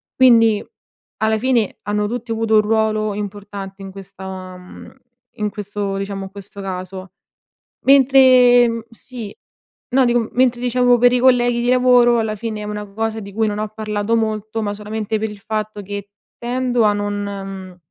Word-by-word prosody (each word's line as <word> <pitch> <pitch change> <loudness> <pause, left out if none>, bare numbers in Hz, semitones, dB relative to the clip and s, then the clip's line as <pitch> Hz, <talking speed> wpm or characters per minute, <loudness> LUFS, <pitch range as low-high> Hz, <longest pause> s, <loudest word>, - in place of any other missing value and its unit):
quindi, 230 -4 +5 0.6
alla 220 0 +1
fine, 240 -3 0
hanno 210 +1 -1
tutti 240 +1 -5
avuto 225 0 +1
un 215 - +6
ruolo 215 0 0
importante 200 -1 -7
in 195 - -7
questa 190 -1 -9
mhmm, 180 0 -13 0.5
in 210 -1 0
questo 205 -1 -4
diciamo, 195 0 -4
in 190 - -11
questo 200 0 -10
caso. 185 0 -7 0.7
Mentre, 255 -3 +6
mhmm 230 0 -3
sì. 230 -2 -10 0.5
No, 260 +1 +3
dico, 240 0 +2
m 225 - -4
mentre 245 -1 +2
diciamo 245 0 +3
per 245 +1 +5
i 250 - +2
colleghi 245 -2 +3
di 245 - -1
lavoro, 250 -1 +4
alla 220 -1 -1
fine 215 0 -5
è - - -5
una 210 0 -5
cosa 220 +2 -3
di 200 -1 -9
cui 220 +2 0
non 205 0 -3
ho 215 0 -2
parlato 215 +1 -2
molto, 220 0 -2
ma 205 -1 -2
solamente 215 +1 -4
per 220 0 -2
il 210 - -10
fatto 215 0 -4
che 200 0 -7 0.3
tendo 245 0 0
a 210 - +4
non 205 0 -2
mhmm, 195 -2 -7
215 Hz, 175 wpm, -19 LUFS, 200-240 Hz, 0.7 s, un